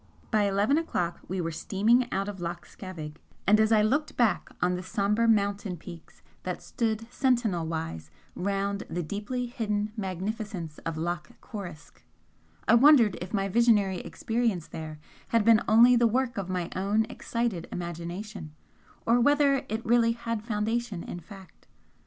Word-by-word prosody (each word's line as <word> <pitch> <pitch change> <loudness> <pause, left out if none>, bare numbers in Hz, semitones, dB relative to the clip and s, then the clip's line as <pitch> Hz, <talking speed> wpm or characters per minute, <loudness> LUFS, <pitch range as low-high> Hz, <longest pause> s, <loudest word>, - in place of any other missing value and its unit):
By 215 -3 +3
eleven 205 +9 +2
o'clock 175 - -2
we 190 +1 -3
were 165 -1 -2
steaming 220 +9 +2
out 195 +1 -1
of 205 -2 -6
Loch 170 0 -5
Scavaig, 160 -6 -8 0.3
and 210 +3 +5
as 220 0 +3
I 215 -1 +5
looked 290 +7 0
back 225 -7 +2
on 180 0 +2
the 180 - -3
sombre 205 +4 +1
mountain 200 -3 +1
peaks 170 0 -12 0.2
that - - -5
stood 225 -3 -2
sentinel 230 -11 +1
wise 80 - -4 0.2
round 200 +1 -1
the 175 +1 -2
deeply 210 +9 -3
hidden 215 -4 -2
magnificence 190 -3 -4
of 165 -1 -3
Loch 175 +2 -4
Coruisk, 175 -8 -9 0.7
I - - +5
wondered 235 -5 +7
if 180 - -6
my 195 -2 0
visionary 205 -3 +3
experience 225 -7 -1
there 155 -1 -7 0.3
had 230 -2 +2
been 230 -1 +6
only 235 +3 +7
the 235 -1 +4
work 245 +1 0
of 195 -3 -4
my 180 -2 -2
own 205 +4 +1
excited 230 -6 -3
imagination, 175 0 -6 0.5
or 235 +1 +4
whether 280 0 +4
it 220 +1 -3
really 230 0 +4
had 230 -2 -3
foundation 220 -2 -2
in 175 - -6
fact? 190 +1 -14
205 Hz, 155 wpm, -28 LUFS, 180-230 Hz, 0.7 s, wondered